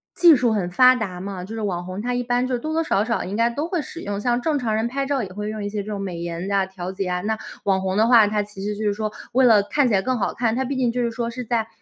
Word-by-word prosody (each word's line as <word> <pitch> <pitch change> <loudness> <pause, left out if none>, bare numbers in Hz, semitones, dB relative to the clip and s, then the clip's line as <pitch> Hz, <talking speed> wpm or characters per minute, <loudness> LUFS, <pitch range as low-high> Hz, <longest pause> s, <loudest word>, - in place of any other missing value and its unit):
技 345 -3 +7
术 245 -2 +2
很 180 -4 -1
发 255 +5 +6
达 190 -7 -4
嘛， 190 -2 -5
就 210 +4 -8
是 220 - -4
网 180 -4 -2
红 185 +2 -5
她 245 +1 -2
一 245 0 -1
般 245 +1 0
就 255 - 0
是 - - -3
多 310 +4 -4
多 325 - +1
少 205 -9 +1
少 230 - -1
应 195 +3 -4
该 230 +1 +3
都 290 +7 -3
会 350 -3 -1
使 335 +5 -8
用， 205 0 -3
像 245 +1 +1
正 305 0 +1
常 225 -3 -1
人 220 +2 0
拍 275 +2 -2
照 275 -2 0
也 190 - -6
会 210 +1 -4
用 215 -1 -5
一 - - -2
些 205 -1 -3
这 215 - -7
种 200 - -3
美 180 -3 -4
颜 170 +2 -4
呀、 200 -1 +1
调 185 -1 -7
节 195 +1 -3
呀， 180 0 -1
那 220 +2 -1 0.3
网 190 -1 +2
红 190 +1 -1
的 220 +2 +4
话， 235 -3 +7
她 210 0 0
其 200 -1 -9
实 210 0 -2
就 215 - -3
是 205 - +2
说 215 0 -3 0.2
为 260 0 +5
了 220 -4 +6
看 275 +7 +1
起 - - 0
来 190 - +3
更 255 +3 -1
好 205 - -1
看， 230 -2 0
她 265 - 0
毕 275 +2 -3
竟 250 -2 +2
就 250 +1 -1
是 235 - 0
说 235 0 -3
是 250 +1 -6
在 225 -1 -1
220 Hz, 360 characters per minute, -22 LUFS, 200-245 Hz, 0.3 s, 技